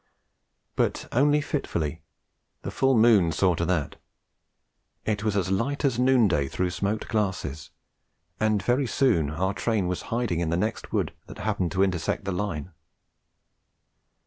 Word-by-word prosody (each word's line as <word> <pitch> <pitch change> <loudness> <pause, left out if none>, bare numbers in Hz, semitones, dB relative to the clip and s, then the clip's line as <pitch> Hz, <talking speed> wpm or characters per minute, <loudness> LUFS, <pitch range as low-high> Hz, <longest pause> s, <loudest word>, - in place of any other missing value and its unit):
But - - 0
only 145 +4 +3
fitfully; 85 - -3 0.6
the - - -4
full 135 -2 +2
moon 110 -7 +5
saw 90 +4 +2
to 85 0 -1
that. 85 -6 -1 1.1
It 105 -1 -1
was 105 -2 0
as 95 -1 0
light 135 +10 0
as 125 -4 +1
noonday 115 - +3
through 90 +5 -1
smoked 100 +3 -2
glasses, 90 - -2 0.7
and 110 -2 +1
very 125 +4 +1
soon 105 - +2
our 95 +6 -1
train 110 -3 0
was 90 0 -2
hiding 115 -7 0
in 85 -2 -1
the 85 - +1
next 110 +5 -2
wood - - -1
that - - -10
happened 100 -4 -1
to 95 0 +3
intersect 90 0 -1
the 95 - -1
line. 90 -4 -3
100 Hz, 145 wpm, -26 LUFS, 85-115 Hz, 1.1 s, moon